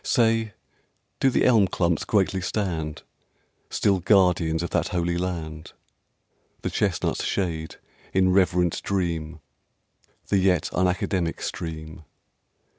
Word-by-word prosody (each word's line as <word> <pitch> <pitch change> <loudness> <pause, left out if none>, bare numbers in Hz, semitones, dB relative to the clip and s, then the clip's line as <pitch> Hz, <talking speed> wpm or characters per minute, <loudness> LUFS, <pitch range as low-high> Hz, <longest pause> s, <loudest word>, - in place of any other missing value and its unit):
Say, 115 -3 +2 0.7
do 135 - +4
the - - +2
elm 110 -6 +5
clumps 85 -3 0
greatly 95 -2 +1
stand 85 -6 -3 0.7
Still 100 -2 +1
guardians 90 -3 +3
of 85 - -4
that - - +1
holy 85 -1 -1
land? 85 -3 -4 0.9
The - - -2
chestnuts - - 0
shade, 80 -5 -2 0.4
in 95 -1 +3
reverend 90 -2 +2
dream, 85 -5 -2 0.9
The 100 - +3
yet 90 -3 +2
unacademic 90 -1 0
stream? 80 -1 -6
90 Hz, 110 wpm, -25 LUFS, 80-95 Hz, 0.9 s, elm